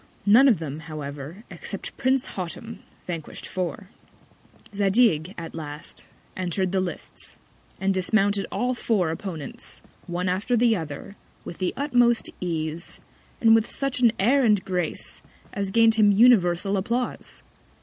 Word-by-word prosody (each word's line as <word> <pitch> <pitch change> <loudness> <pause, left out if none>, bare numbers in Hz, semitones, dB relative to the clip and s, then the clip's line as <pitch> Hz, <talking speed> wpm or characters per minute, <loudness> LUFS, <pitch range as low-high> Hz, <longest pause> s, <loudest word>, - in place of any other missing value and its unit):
None 230 +7 +7
of 235 -7 +5
them, 155 -2 -5
however, 150 +3 -7
except 180 +2 -7
Prince 265 0 +1
Hottam, 200 +5 -6 0.3
vanquish'd 165 -4 -6
four. 185 +2 -4 0.8
Zadig, 195 -4 +2
at 165 -1 -7
last, 150 0 -7 0.3
enter'd 185 0 -1
the 190 -1 +1
Lists, 180 -3 -4 0.4
and 195 +1 +1
dismounted 200 +1 +2
all 250 +1 0
his 245 - -9
four 185 -8 +2
Opponents, 165 -4 -5 0.3
one 175 +1 -2
after 200 +7 +1
the 230 -1 +4
other, 160 +3 -6 0.3
with 170 - -8
the 185 -2 0
utmost 245 -5 +2
Ease, 165 -1 -3 0.4
and 225 -1 +6
with 225 0 +3
such 275 -2 -1
an 240 -2 +5
Air 260 +8 +3
and 210 -5 +3
Grace, 180 -4 -1 0.3
as 200 -1 -2
gain'd 225 +2 +5
him 215 -2 +5
universal 200 -4 +4
Applause. 235 +6 -3
195 Hz, 140 wpm, -25 LUFS, 170-225 Hz, 0.8 s, None